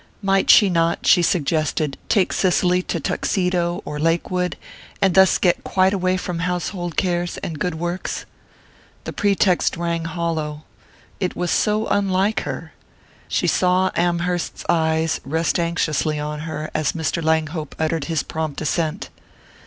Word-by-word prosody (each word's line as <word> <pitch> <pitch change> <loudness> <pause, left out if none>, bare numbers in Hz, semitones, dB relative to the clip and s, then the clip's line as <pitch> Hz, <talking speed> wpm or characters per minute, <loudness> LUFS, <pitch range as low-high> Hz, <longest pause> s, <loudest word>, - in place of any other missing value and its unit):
Might 195 0 +2
she 205 - +8
not, 170 -2 +1
she 180 - +6
suggested, 155 -3 0
take 195 -4 +2
Cicely 180 -1 +2
to 170 - -1
Tuxedo 175 +2 -1
or 150 - -5
Lakewood, 175 +3 0 0.4
and 195 -2 +3
thus 190 0 +5
get 180 -2 +1
quite 190 +1 +2
away 185 -1 +1
from 180 -2 -4
household 180 0 -3
cares 175 -2 0
and 160 -3 -4
good 180 0 -1
works? 175 +3 -4 0.8
The - - -6
pretext 195 -4 +2
rang 170 -1 -2
hollow 165 -3 -3 0.6
it 185 -2 -2
was 180 0 -1
so 215 +1 +1
unlike 200 +1 +1
her! - - -6 0.5
She - - 0
saw 185 +1 +2
Amherst's 175 0 -1
eyes 160 -1 +1
rest 160 +5 0
anxiously 160 -3 0
on 150 0 -4
her 155 0 -5
as 155 - 0
Mr. 165 0 -2
Langhope 160 -1 -1
uttered 160 -1 -1
his 165 -4 -1
prompt 155 -2 -4
assent. 160 +4 -1
170 Hz, 140 wpm, -21 LUFS, 160-180 Hz, 0.8 s, she